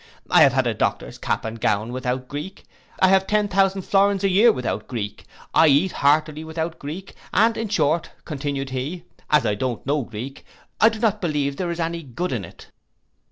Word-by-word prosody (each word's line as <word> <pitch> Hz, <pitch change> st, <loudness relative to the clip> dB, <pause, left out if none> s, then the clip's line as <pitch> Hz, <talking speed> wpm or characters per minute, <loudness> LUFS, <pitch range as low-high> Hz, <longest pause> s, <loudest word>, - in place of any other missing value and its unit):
I -, -, +7 dB
have -, -, +6 dB
had -, -, +2 dB
a -, -, +1 dB
doctor's -, -, -2 dB
cap -, -, -2 dB
and 110 Hz, 0 st, -6 dB
gown 105 Hz, +3 st, 0 dB
without 125 Hz, 0 st, -3 dB
Greek: 150 Hz, +8 st, -7 dB, 0.3 s
I 185 Hz, -, +5 dB
have 190 Hz, 0 st, +4 dB
ten 210 Hz, -1 st, +2 dB
thousand 195 Hz, 0 st, +1 dB
florins 200 Hz, 0 st, +2 dB
a 195 Hz, -, +3 dB
year 210 Hz, +6 st, +6 dB
without 125 Hz, -1 st, -3 dB
Greek; 105 Hz, -5 st, -5 dB, 0.3 s
I 160 Hz, -, +6 dB
eat 150 Hz, +6 st, +4 dB
heartily 155 Hz, +2 st, +1 dB
without 160 Hz, +1 st, -4 dB
Greek, 160 Hz, +7 st, -7 dB, 0.2 s
and 225 Hz, +3 st, +3 dB
in 225 Hz, -1 st, -3 dB
short, 165 Hz, -5 st, +1 dB, 0.2 s
continued 140 Hz, -3 st, -4 dB
he, 145 Hz, +7 st, -4 dB, 0.3 s
as 150 Hz, -1 st, +4 dB
I -, -, +2 dB
don't 120 Hz, +2 st, -3 dB
know 145 Hz, +2 st, +1 dB
Greek, 120 Hz, +3 st, -7 dB, 0.4 s
I 225 Hz, -, +7 dB
do 225 Hz, -, -6 dB
not 215 Hz, -2 st, +1 dB
believe 145 Hz, -5 st, -1 dB
there 180 Hz, -2 st, -2 dB
is 170 Hz, 0 st, -4 dB
any 165 Hz, 0 st, -2 dB
good 160 Hz, +6 st, -4 dB
in 115 Hz, -6 st, -2 dB
it. -, -, -13 dB
155 Hz, 200 wpm, -23 LUFS, 135-190 Hz, 0.4 s, I